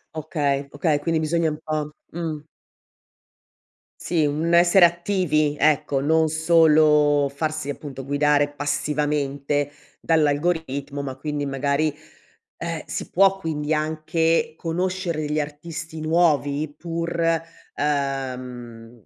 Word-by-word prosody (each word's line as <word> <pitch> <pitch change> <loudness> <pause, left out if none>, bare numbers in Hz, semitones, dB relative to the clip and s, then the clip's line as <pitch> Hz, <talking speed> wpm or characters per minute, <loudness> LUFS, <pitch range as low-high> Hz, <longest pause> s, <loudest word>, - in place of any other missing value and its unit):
Okay, 145 -3 -1
okay, 145 -1 +1
quindi 165 +1 0
bisogna 160 +1 +1
un 150 - -4
po' 155 -1 -2 0.2
Mh. 160 -3 -4 1.6
Sì, 165 -3 +1
un 155 +4 0
essere 175 +2 +7
attivi 170 -4 +1
ecco, 150 -2 +2
non 160 +2 +3
solo 155 -3 +4
farsi 155 0 -3
appunto 140 -2 -6
guidare 145 +1 +2
passivamente 145 0 -1 0.3
dall'algoritmo, 145 -2 0
ma 135 -2 -5
quindi 145 +1 -3
magari, 140 +2 0 0.6
ehm, 165 -2 -4
si - - -5
può 195 +1 +4
quindi 155 -3 -2
anche 160 +1 0
conoscere 175 -1 -2
degli 150 0 -1
artisti 160 +2 -6
nuovi 155 -2 +1
pur, 170 0 -4 0.6
ehm, 125 -5 -4
150 Hz, 105 wpm, -23 LUFS, 145-165 Hz, 1.6 s, essere